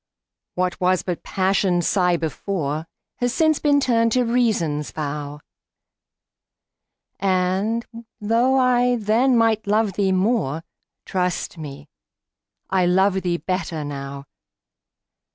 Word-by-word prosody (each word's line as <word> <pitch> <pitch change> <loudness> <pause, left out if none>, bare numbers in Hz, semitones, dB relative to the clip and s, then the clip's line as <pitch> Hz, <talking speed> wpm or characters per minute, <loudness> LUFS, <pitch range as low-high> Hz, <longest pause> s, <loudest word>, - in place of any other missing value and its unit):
What 180 0 -1
was 185 0 +2
but 180 -2 -3
Passion's 190 -2 +1
sigh 180 -3 +2
before, 160 -1 -3 0.3
Has 245 0 -1
since 315 -2 +3
been 290 -1 +3
turned 230 -4 +2
to 255 - +3
Reason's 210 -12 0
vow; 150 -1 -5 1.8
And, 190 +4 0 0.3
though 235 +5 +2
I 250 -1 +3
then 235 +3 +2
might 225 -2 +2
love 210 -1 +2
thee 195 0 +1
more, 185 - 0 0.4
Trust 180 -2 -2
me, 145 -1 -8 0.8
I 185 -2 +3
love 190 +1 +3
thee 175 -2 -1
better 170 -4 -3
now. 140 -1 -6
190 Hz, 110 wpm, -22 LUFS, 165-230 Hz, 1.8 s, since